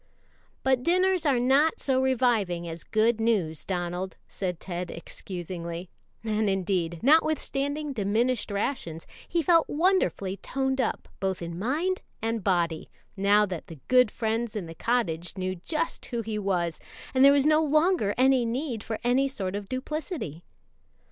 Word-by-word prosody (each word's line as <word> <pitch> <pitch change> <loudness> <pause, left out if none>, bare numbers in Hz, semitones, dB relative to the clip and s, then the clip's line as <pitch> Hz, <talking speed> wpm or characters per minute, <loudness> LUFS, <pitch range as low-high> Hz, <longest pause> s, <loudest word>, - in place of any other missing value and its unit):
"But 260 -1 +3
dinners 365 +2 +2
are 265 -4 +3
not 275 +6 +3
so 260 -2 +1
reviving 230 -10 +1
as 165 0 -6
good 225 +1 +2
news, 195 -9 0
Donald," 180 0 -3
said 180 -3 -4
Ted 180 -1 -5
excusingly; 175 0 -6 0.3
and 215 -1 +1
indeed, 180 -3 -1
notwithstanding 290 0 +2
diminished 225 +2 0
rations, 200 - -3 0.2
he 335 -1 0
felt 330 +1 +4
wonderfully 305 - +1
toned 265 +5 -1
up - - -2
both 190 -1 -1
in 170 0 -5
mind 320 - 0 0.2
and 225 -1 -2
body, 170 -4 0 0.3
now 205 +1 +4
that 180 -5 -6
the 165 -4 -10
good 250 -2 +6
friends 225 +1 -2
in 205 -5 -3
the 165 - -8
cottage 175 -5 -1
knew 185 0 -2
just 305 - -3
who 235 -2 -3
he 215 -1 -3
was 175 -5 -1 0.3
and 260 0 +4
there 280 - +9
was 280 -1 +3
no 305 +1 +5
longer 305 - +2
need 255 -1 +2
for 220 - -3
any 255 +3 +3
sort 195 -8 -4
of 205 -1 -5
duplicity. 260 - -4
225 Hz, 150 wpm, -27 LUFS, 185-270 Hz, 0.3 s, there